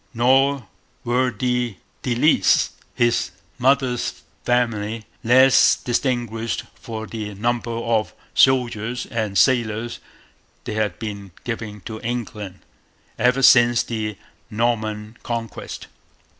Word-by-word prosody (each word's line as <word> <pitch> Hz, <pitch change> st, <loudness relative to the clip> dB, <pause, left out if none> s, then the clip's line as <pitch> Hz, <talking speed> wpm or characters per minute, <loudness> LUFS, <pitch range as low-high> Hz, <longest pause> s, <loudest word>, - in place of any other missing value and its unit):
Nor 135 Hz, +2 st, +3 dB, 0.4 s
were 125 Hz, +2 st, +1 dB
the 125 Hz, 0 st, -1 dB, 0.3 s
De 125 Hz, -2 st, -1 dB
Lisles, 150 Hz, +6 st, +3 dB, 0.2 s
his 120 Hz, -5 st, +2 dB, 0.3 s
mother's 130 Hz, -1 st, +1 dB, 0.2 s
family, 115 Hz, -3 st, 0 dB, 0.2 s
less 130 Hz, +3 st, +6 dB
distinguished 120 Hz, -3 st, -2 dB
for 110 Hz, -1 st, -7 dB
the 105 Hz, -2 st, -6 dB
number 120 Hz, +3 st, -1 dB
of 115 Hz, -1 st, 0 dB, 0.2 s
soldiers 125 Hz, -2 st, +2 dB
and 110 Hz, -4 st, -2 dB
sailors 120 Hz, -2 st, +2 dB, 0.6 s
they -, -, -5 dB
had 105 Hz, -1 st, -1 dB
been 100 Hz, -4 st, -7 dB
giving 110 Hz, -3 st, -5 dB
to 110 Hz, +3 st, -7 dB
England 110 Hz, -5 st, -5 dB, 0.6 s
ever 125 Hz, +2 st, +2 dB
since 120 Hz, -1 st, +6 dB
the 110 Hz, -3 st, -4 dB, 0.3 s
Norman 110 Hz, -1 st, -2 dB
Conquest. 115 Hz, -3 st, -5 dB
115 Hz, 100 wpm, -22 LUFS, 110-125 Hz, 0.6 s, less